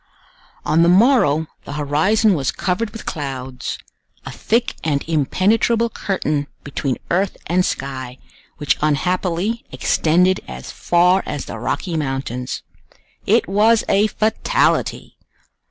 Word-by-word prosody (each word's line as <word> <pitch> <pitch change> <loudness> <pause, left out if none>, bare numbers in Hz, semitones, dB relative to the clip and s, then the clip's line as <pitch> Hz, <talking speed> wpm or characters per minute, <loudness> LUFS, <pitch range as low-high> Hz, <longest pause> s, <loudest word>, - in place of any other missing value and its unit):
On 155 +2 +3
the 170 - +5
morrow 180 - +4 0.2
the - - -7
horizon 160 +10 +2
was 140 -6 0
covered 195 +5 -1
with 225 +1 -10
clouds—a 130 -3 -7
thick 235 +2 0
and 145 -3 0
impenetrable 215 - +2
curtain 150 -9 -2 0.2
between 140 -2 -2
earth 190 +3 +1
and 180 +2 +2
sky, 130 -5 -4 0.4
which 145 -3 0
unhappily 180 +7 0
extended 180 +4 +2
as - - -8
far 180 +2 +3
as 145 -2 -4
the 115 - -7
Rocky 165 - -2
Mountains. 135 -3 -3 0.6
It 225 +3 +3
was 215 +3 +3
a 205 +2 +3
fatality! 220 - 0
175 Hz, 115 wpm, -20 LUFS, 145-210 Hz, 0.6 s, the